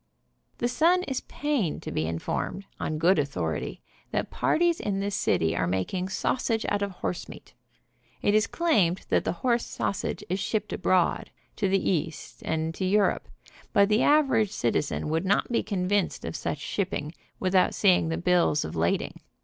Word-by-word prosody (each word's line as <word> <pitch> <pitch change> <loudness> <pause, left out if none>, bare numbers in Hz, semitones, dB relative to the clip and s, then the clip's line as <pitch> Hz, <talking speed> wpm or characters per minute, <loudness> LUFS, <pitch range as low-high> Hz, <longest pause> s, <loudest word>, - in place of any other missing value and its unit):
The 240 - 0
Sun 345 +8 +3
is 265 -7 -3
pained 280 - -1
to - - -5
be 80 - -1
informed, 85 - -3
on 155 - -2
good 170 +2 +4
author 90 - -1
ity, - - -6 0.3
that - - -2
parties 340 0 +2
in 195 -2 -2
this 200 +1 -2
city 85 - +1
are - - 0
making 95 - -1
sausage 225 +3 0
out 205 - 0
of 200 - 0
horsemeat. 180 -1 -6 0.7
It 205 - +3
is 215 +1 +3
claimed 205 - +1
that - - +2
the - - +1
horse 240 -1 +3
sausage 200 - -3
is 185 +2 -1
shipped 210 +1 -2
abroad, 185 -2 +1 0.3
to 195 - +1
the 195 - +3
East, 165 -3 -2
and 160 0 -1
to 190 - -4
Europe, 200 +2 +2 0.5
but 200 0 +5
the 215 +2 +3
average 275 -8 +4
citizen 145 - -1
would 160 +2 0
not 200 +5 +1
be 235 - +2
convinced 200 -1 -1
of - - -4
such - - -2
ship 195 -2 -2
ment 150 +2 -4 0.3
without 185 -1 +2
seeing 180 -5 +4
the 165 - -1
bills 175 -4 +2
of 80 - -6
lading. 85 +1 -1
190 Hz, 175 wpm, -27 LUFS, 160-215 Hz, 0.7 s, but